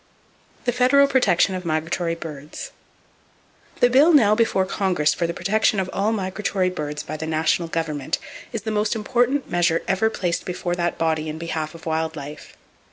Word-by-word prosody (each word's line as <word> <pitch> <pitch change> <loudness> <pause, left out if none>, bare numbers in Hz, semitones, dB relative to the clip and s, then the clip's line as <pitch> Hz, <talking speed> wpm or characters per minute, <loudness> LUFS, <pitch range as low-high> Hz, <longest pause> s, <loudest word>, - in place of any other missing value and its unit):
The 245 - +2
Federal 255 +3 +5
Protection 250 -9 +3
Of 185 -1 -4
Migratory 165 +1 -1
Birds 150 -3 -8 1.1
.—The 245 - +6
bill 295 +7 +6
now 220 -8 +6
before 215 -4 +2
Congress 185 -6 +1
for 170 - -1
the 170 - -3
protection 215 0 +1
of 185 -1 -2
all 205 +3 +1
migratory 190 -2 -1
birds 150 -4 -4
by 155 - -6
the 160 +1 -5
national 160 +2 +1
government 155 -4 -2 0.3
is 225 -4 -4
the 220 - -2
most 210 +1 0
important 245 +5 +1
measure 170 -1 +2
ever 195 +4 +2
placed 175 -5 -2
before 175 -1 -3
that 175 -1 -1
body 160 -1 0
in 155 - -5
behalf 160 -1 -4
of 165 - -12
wild 160 0 -1
life. 150 +1 -9
175 Hz, 170 wpm, -23 LUFS, 160-215 Hz, 1.1 s, The